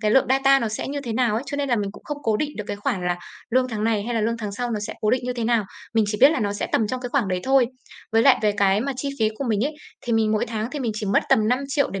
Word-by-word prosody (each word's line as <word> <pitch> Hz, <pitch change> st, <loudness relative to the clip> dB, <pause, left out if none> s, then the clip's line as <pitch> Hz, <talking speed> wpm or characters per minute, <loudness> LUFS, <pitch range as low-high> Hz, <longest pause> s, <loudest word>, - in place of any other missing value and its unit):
cái 215 Hz, -1 st, +1 dB
lượng 265 Hz, +4 st, +4 dB
data 270 Hz, +1 st, +4 dB
nó 230 Hz, -, -1 dB
sẽ 215 Hz, -, -4 dB
như 285 Hz, +1 st, -3 dB
thế 240 Hz, -5 st, -4 dB
nào 235 Hz, -2 st, +1 dB
ấy, 230 Hz, -, -1 dB
cho 285 Hz, -, -4 dB
nên 285 Hz, -1 st, -1 dB
là 240 Hz, -, +2 dB
mình 200 Hz, -2 st, -2 dB
cũng -, -, -14 dB
không 295 Hz, -1 st, -5 dB
cố 220 Hz, -2 st, +1 dB
định 295 Hz, +6 st, -2 dB
được 210 Hz, -, -4 dB
cái 205 Hz, -, -4 dB
khoản 200 Hz, -5 st, -2 dB
là 175 Hz, -, +1 dB, 0.3 s
lương 255 Hz, +2 st, +2 dB
tháng 215 Hz, -3 st, -3 dB
này 220 Hz, -2 st, +1 dB
hay 240 Hz, +1 st, -3 dB
là 225 Hz, -, +1 dB
lương 230 Hz, +2 st, 0 dB
tháng 210 Hz, -3 st, -5 dB
sau 245 Hz, +4 st, -3 dB
nó 215 Hz, -2 st, -2 dB
sẽ 205 Hz, -, -5 dB
cố 215 Hz, -, +2 dB
định 255 Hz, -, +2 dB
như 250 Hz, -, -1 dB
thế 240 Hz, -2 st, -3 dB
nào, 230 Hz, -2 st, +2 dB, 0.3 s
mình 220 Hz, -1 st, +4 dB
chỉ 210 Hz, 0 st, -2 dB
biết 275 Hz, +3 st, +8 dB
là 315 Hz, -, -1 dB
nó 205 Hz, -2 st, 0 dB
sẽ 205 Hz, -, -3 dB
tầm 220 Hz, -, +2 dB
trong 255 Hz, +4 st, -3 dB
cái 250 Hz, -, -4 dB
khoảng 250 Hz, -7 st, +1 dB
đấy 185 Hz, -1 st, -1 dB
thôi. 265 Hz, -2 st, +4 dB, 0.5 s
Với 225 Hz, 0 st, +4 dB
lại 265 Hz, -1 st, +6 dB
về 210 Hz, -1 st, +3 dB
cái 200 Hz, 0 st, +2 dB
mà 275 Hz, +4 st, -1 dB
chi 280 Hz, +2 st, -3 dB
phí 220 Hz, -2 st, +3 dB
của 275 Hz, -, -2 dB
mình 220 Hz, -2 st, +1 dB
ấy, 300 Hz, +2 st, -2 dB, 0.3 s
thì 240 Hz, -, -3 dB
mình 220 Hz, -1 st, +2 dB
mỗi 215 Hz, -, +1 dB
tháng 220 Hz, +1 st, -3 dB
thì 295 Hz, -, -4 dB
mình 235 Hz, -4 st, -1 dB
chỉ 210 Hz, -1 st, -4 dB
mất 195 Hz, -, +3 dB
tầm 215 Hz, 0 st, +4 dB
5.000.000 275 Hz, +3 st, 0 dB
để 195 Hz, -, -4 dB
230 Hz, 345 wpm, -23 LUFS, 210-260 Hz, 0.5 s, biết